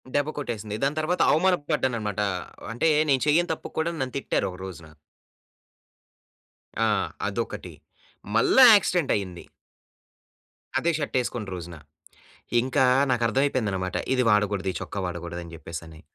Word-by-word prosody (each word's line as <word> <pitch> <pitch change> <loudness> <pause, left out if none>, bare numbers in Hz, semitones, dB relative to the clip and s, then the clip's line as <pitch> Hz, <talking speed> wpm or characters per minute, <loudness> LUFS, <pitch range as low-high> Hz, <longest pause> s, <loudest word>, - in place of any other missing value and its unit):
దెబ్బ 145 +1 +1
కొట్టేసింది. 110 -6 -4
దాని 145 +3 0
తర్వాత 170 +4 0
అవమాన 180 +4 +4 0.2
పడ్డానన్నమాట. 110 -8 -1 0.5
అంటే 120 +8 0 0.2
నేను 135 -2 +3
చెయ్యని 165 +3 +3
తప్పుకు - - -9
కూడా 165 +2 0
నన్ను 130 -1 -3
తిట్టారు 135 - -1
ఒక 90 - -10
రోజున. 85 -4 -9 2.0
ఆ! - - +2 0.4
అదొకటి. - - -4 0.6
మళ్ళా 185 - +6
యాక్సిడెంట్ 180 -7 +1
అయింది. 95 -4 -5 1.4
అదే 170 - +1
షర్ట్ 145 -4 -4
యేసుకున్న 120 -5 -4
రోజున. 85 -1 -8 0.9
ఇంకా 130 +1 +2 0.3
నాకు 120 -1 +1
అర్థమైపోయిందన్నమాట 110 -8 0 0.2
ఇది 130 - +2
వాడగూడదు 105 -2 +1
ఈ - - -8
చొక్కా - - -6
వాడగూడదని 85 -1 -6
జెప్పేసని. 80 -1 -9
115 Hz, 125 wpm, -25 LUFS, 95-145 Hz, 2.0 s, మళ్ళా